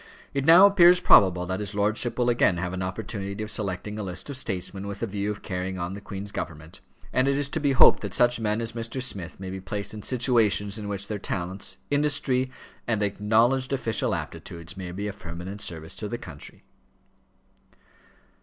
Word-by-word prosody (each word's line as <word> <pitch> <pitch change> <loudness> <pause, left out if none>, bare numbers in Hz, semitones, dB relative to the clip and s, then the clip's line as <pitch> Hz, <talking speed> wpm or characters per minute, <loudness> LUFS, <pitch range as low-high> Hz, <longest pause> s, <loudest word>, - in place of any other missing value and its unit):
It 140 -1 -1
now 170 +5 +9
appears 180 -3 +7
probable 90 - +5
that 95 +2 -3
his 100 -1 -4
lordship 105 +4 0
will 120 -1 +1
again 120 -7 +3
have 90 +1 -3
an 95 - -3
opportunity 100 +1 -4
of 105 - -3
selecting 105 +1 -3
a - - -2
list 95 +7 -4
of - - -3
statesmen 95 -4 -3
with 100 0 -6
the - - +1
view 100 -1 -3
of 105 -1 -5
carrying 95 0 -3
on 85 +1 -3
the 100 - -7
Queen's 100 0 -6
government; 80 -2 -7 0.3
and 130 +1 +3
it 140 0 +2
is 145 -1 +1
to 160 - -1
be 145 -2 +2
hoped 130 - +7
that - - -4
such 120 -1 +4
men 110 0 0
as 115 0 -2
Mr. 115 +2 -5
Smith 95 -10 -4
may 95 -1 -6
be 95 0 -6
placed 100 +2 -4
in 105 - -7
situations 115 -4 +2
in 105 - -6
which 100 -1 -4
their 105 -2 -4
talents, 95 0 -3
industry, 145 -3 +2 0.4
and 110 -3 +1
acknowledged 115 +6 +2
official 115 -5 +1
aptitudes, 85 +2 -7
may 95 -2 -6
be 100 +3 -5
of 100 -1 -5
permanent 90 +4 -7
service 80 -1 -4
to 105 - -5
the 120 - -3
country." 80 -10 -8
105 Hz, 200 wpm, -26 LUFS, 95-120 Hz, 0.4 s, now